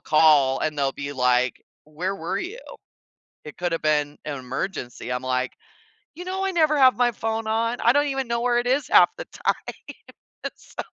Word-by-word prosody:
call 150 -4 +4
and 155 -1 -1
they'll 135 -1 +1
be 140 +1 -5
like, 125 -1 +1 0.2
"Where 175 +6 -4
were 185 +2 -3
you? 395 +7 -5 0.9
It 150 - -10
could 175 -1 -2
have 165 - -2
been 150 -1 +1
an 145 -2 -4
emergency," 125 -2 -5
I'm 125 +1 -2
like, 130 0 -1 0.6
"You 355 +3 -8
know, 380 +1 -3
I 385 - 0
never 310 -4 +3
have 260 -3 +6
my 245 -1 +3
phone 225 0 -3
on 230 +2 0
I 235 - +5
don't 290 +1 +3
even 270 -2 -2
know 235 0 -1
where 240 0 +2
it 240 - -2
is 270 +3 +1
half - - +6
the - - -6
time, - - -3 0.8
so" - - -8
185 Hz, 190 wpm, -24 LUFS, -, 0.9 s, have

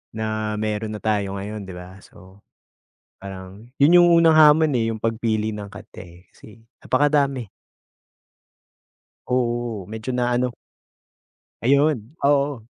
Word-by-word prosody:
na 110 -1 -3
mayro'n 110 0 -3
na 105 - -6
tayo 100 -2 -2
ngayon 105 +1 -6
'di 95 - -9
ba. 90 +1 -11
So, 95 +2 -18 0.8
parang 95 +4 -11
'yon 150 +5 +5
'yong 175 0 +7
unang 165 -1 +5
hamon 155 0 +6
eh, 115 -1 0
'yong 110 - -6
pagpili 110 -1 -1
ng 100 -1 -8
kanta 105 -1 -12
eh, 90 +1 -17
kasi 110 +1 -17 0.2
napakadami. 140 -3 +1 1.8
Oo, 120 -5 -2
medyo 110 +3 -7
na 125 0 0
ano 125 0 0 1.1
Ayon, 140 +1 +1
oo, 140 -5 +1
110 Hz, 125 wpm, -22 LUFS, 105-135 Hz, 1.8 s, yong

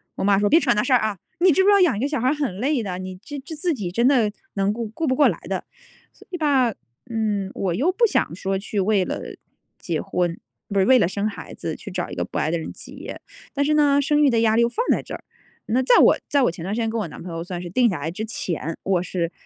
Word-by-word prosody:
我 - - -3
妈 200 0 +4
说： 205 - +2
“别 325 - +6
扯 245 -7 +2
那 210 - +1
事 260 - +1
儿 245 - +6
啊， 215 -3 -2 0.2
你 365 0 +5
知 380 - +3
不 - - +2
知 410 - +7
道 400 - +6
养 310 - +3
一 - - -3
个 275 - 0
小 290 -5 -2
孩 255 - +1
儿 - - +2
很 275 -11 -3
累 275 -2 +1
的， 180 -2 -4
你 185 0 -7
这 290 - -7
这 285 +4 -9
自 335 +2 0
己 195 -9 -4
真 235 +6 +2
的 235 -7 +3 0.2
能 195 0 +1
顾 230 0 -4
顾 320 +9 -3
不 260 - +2
过 290 - +5
来 - - 0
的。 - - -4 0.5
“所 - - -19
以 355 - -3
吧， 270 -7 +2 0.4
嗯， 210 -4 -1
我 185 -3 -1
又 305 - +2
不 465 +5 +3
想 - - 0
说 195 0 -2
去 205 +1 -3
为 195 -1 +2
了 - - -3 0.6
结 165 -3 -3
婚， 175 -1 -2 0.3
不 200 -1 0
是 190 - +4
为 260 +2 +6
了 - - +3
生 200 +3 -2
孩 210 - -7
子 - - -5
去 - - -9
找 - - -3
一 - - -6
个 - - -1
不 - - -6
爱 - - 0
的 170 - 0
人 - - -6
结。 - - -9 0.3
但 285 -1 0
是 305 - +2
呢， 290 -2 +4
生 295 +1 +2
育 280 - +5
的 230 -2 +2
压 220 -1 +3
力 235 - +4
又 235 - +3
放 475 - -2
在 - - +2
这 - - -9
儿。 - - -11 0.4
那 245 +4 +2
在 465 - +5
我 - - +6
在 280 -2 +3
我 175 - +3
前 165 -1 -9
段 195 +3 -3
时 235 - -2
间 225 - 0
跟 225 0 -2
我 175 - -3
男 - - -10
朋 175 -1 -7
友 165 0 -4
算 175 -1 -6
是 175 - -7
定 240 +5 +3
下 175 -7 -3
来 155 +3 -3
之 200 +6 -5
前， 165 -7 -4
我 185 -2 +1
是 175 -2 -2
220 Hz, 320 characters per minute, -23 LUFS, 190-280 Hz, 0.6 s, 知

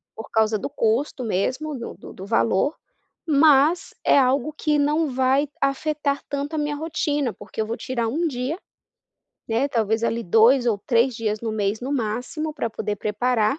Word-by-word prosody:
por 220 - -9
causa 220 0 +2
do 200 - -5
custo 250 +5 0
mesmo 260 +8 -1
do 235 - -6
do - - -12
do 190 - -9
valor, 190 - +1 0.5
mas 305 +3 +4
é - - +5
algo 270 +2 +2
que 300 -1 0
não 300 +2 +2
vai 265 +3 +2
afetar 280 +1 0
tanto 285 +2 -3
a - - 0
minha 295 0 -1
rotina, 295 -5 -1
porque - - -6
eu 215 - -2
vou 230 - -2
tirar 240 -3 -2
1 320 +9 0
dia, 260 +3 -3 0.9
né, 235 +5 +1
talvez, 225 -3 0
ali, 235 0 0
2 230 +6 +4
ou 220 -4 +2
3 240 +1 +3
dias 215 -2 -2
no 230 - -3
mês, 210 0 -1
no 260 +3 -3
máximo, 255 +6 -2
pra 235 -6 -2
poder 210 -1 -3
preparar 220 +4 0
255 Hz, 175 wpm, -23 LUFS, 220-290 Hz, 0.9 s, é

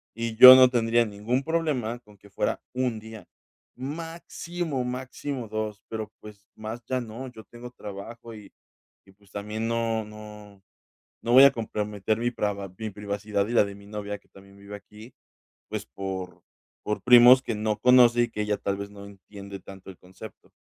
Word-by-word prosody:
Y 115 0 -4
yo 130 +1 +12
no 130 -1 +7
tendría 120 -1 +2
ningún 110 +6 -2
problema 140 -8 -1
con 105 -4 -21
que 100 - -19
fuera - - -2
1 125 -3 -1
día 110 -3 -11 0.5
máximo, 165 +1 -5
máximo 130 0 -5
2 110 -1 -4
pero, 110 -2 -5
pues, 105 -1 -14
más 110 +2 -7
ya 130 -1 -1
no. 120 +3 -8
Yo 110 -2 -13
tengo 120 +1 -11
trabajo, 115 +2 -9
y 105 -2 -13 0.5
y, 95 - -19
pues, 100 -1 -26
también 105 +2 -4
no, 115 -1 -1
no, 105 -2 -12 0.6
no 120 - -2
voy 130 +2 +9
a 140 - +8
comprometer 105 -2 -3
mi 120 +1 0
preva 100 -3 -3
mi 110 -1 -5
privacidad 100 0 -3
y 115 - -5
la 105 - +5
de 100 - -8
mi 100 0 -15
novia 105 -1 -5
que - - -34
también 100 0 -18
vive 100 +1 -10
aquí, 105 +4 -15 0.6
pues, - - -5
por 95 -2 -7 0.4
por 105 - -2
primos 125 +1 +8
que 115 - -3
no 105 0 -1
conoce, 125 -1 +6
y 120 - -2
que 105 - -4
ella 105 0 0
tal 100 0 -3
vez 100 0 -6
no 100 0 -11
entiende 100 0 -11
tanto 95 +1 -13
el 90 - -17
concepto. 95 +4 -14
110 Hz, 180 wpm, -26 LUFS, 100-120 Hz, 0.6 s, yo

